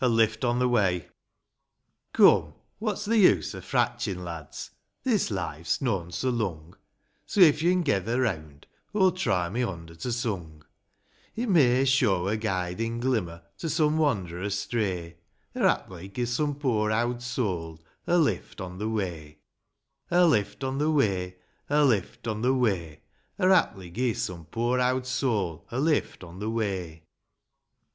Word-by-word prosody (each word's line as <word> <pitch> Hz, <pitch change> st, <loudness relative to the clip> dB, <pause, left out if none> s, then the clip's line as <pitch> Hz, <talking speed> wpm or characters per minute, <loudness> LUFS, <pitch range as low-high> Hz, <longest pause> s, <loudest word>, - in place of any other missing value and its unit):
gl 115 Hz, -2 st, +5 dB
pft 110 Hz, +2 st, -11 dB
on 120 Hz, -, +1 dB
the 125 Hz, 0 st, +2 dB
m^u 95 Hz, -8 st, +1 dB, 1.1 s
OME, -, -, +6 dB, 0.3 s
what's 210 Hz, -1 st, -2 dB
th' -, -, -6 dB
use 205 Hz, -5 st, +4 dB
o' -, -, -7 dB
fratchin',' 90 Hz, -2 st, -1 dB
lads, 85 Hz, -4 st, -7 dB, 0.3 s
this 225 Hz, -7 st, +1 dB
life's 85 Hz, -5 st, -2 dB
noan 95 Hz, -10 st, -1 dB
so 130 Hz, +9 st, -1 dB
lung, 90 Hz, -9 st, -3 dB, 0.5 s
So, -, -, -2 dB
if 155 Hz, -3 st, +7 dB
yo'n 180 Hz, +2 st, +3 dB
gether 110 Hz, -, 0 dB
reawnd, 80 Hz, -, -3 dB, 0.3 s
aw'll 190 Hz, -3 st, +5 dB
try 95 Hz, -, 0 dB
my 115 Hz, +7 st, -3 dB
hond 85 Hz, -8 st, -4 dB
at 85 Hz, 0 st, -11 dB
a 115 Hz, -7 st, -2 dB, 0.9 s
It 240 Hz, +2 st, -2 dB
may 135 Hz, -7 st, +4 dB
shew 110 Hz, -9 st, +2 dB
a 105 Hz, -, +1 dB
guidin' 110 Hz, +2 st, -2 dB
glimmer 95 Hz, -10 st, -1 dB, 0.2 s
to 165 Hz, -, -3 dB
some 155 Hz, 0 st, +2 dB
wand'rer 95 Hz, -, 0 dB
astray, 100 Hz, -4 st, -2 dB, 0.4 s
Or, -, -, +2 dB
haply, 95 Hz, 0 st, -3 dB
gi' 120 Hz, +5 st, -3 dB
some 145 Hz, +4 st, -1 dB
poor 120 Hz, -7 st, 0 dB
ovvd 120 Hz, +2 st, 0 dB
soul 90 Hz, -10 st, -3 dB, 0.2 s
a 175 Hz, -, +3 dB
lift 155 Hz, -8 st, 0 dB
on 90 Hz, -1 st, -7 dB
the 110 Hz, +1 st, -2 dB
way: 85 Hz, -8 st, -4 dB, 0.7 s
A 180 Hz, +1 st, +5 dB
lift 105 Hz, -, +1 dB
on 135 Hz, +1 st, -2 dB
the 150 Hz, +1 st, +2 dB
way; 95 Hz, -11 st, +1 dB, 0.3 s
A 150 Hz, 0 st, +4 dB
lift 115 Hz, -1 st, 0 dB
on 110 Hz, -1 st, -2 dB
the 130 Hz, +2 st, +2 dB
way; 95 Hz, -, -1 dB, 0.4 s
Or, 185 Hz, -, +3 dB
haply, 95 Hz, -, +2 dB
gi' 120 Hz, +3 st, 0 dB
some 90 Hz, -8 st, -4 dB
poor 120 Hz, +8 st, 0 dB
owd 125 Hz, 0 st, +1 dB
soul 105 Hz, -, -1 dB
a 120 Hz, -, -3 dB
lift 150 Hz, -, 0 dB
on 90 Hz, +1 st, -11 dB
the 105 Hz, +2 st, -2 dB
way, 100 Hz, -6 st, -2 dB
II. 80 Hz, 0 st, -21 dB
110 Hz, 155 wpm, -27 LUFS, 90-130 Hz, 1.1 s, if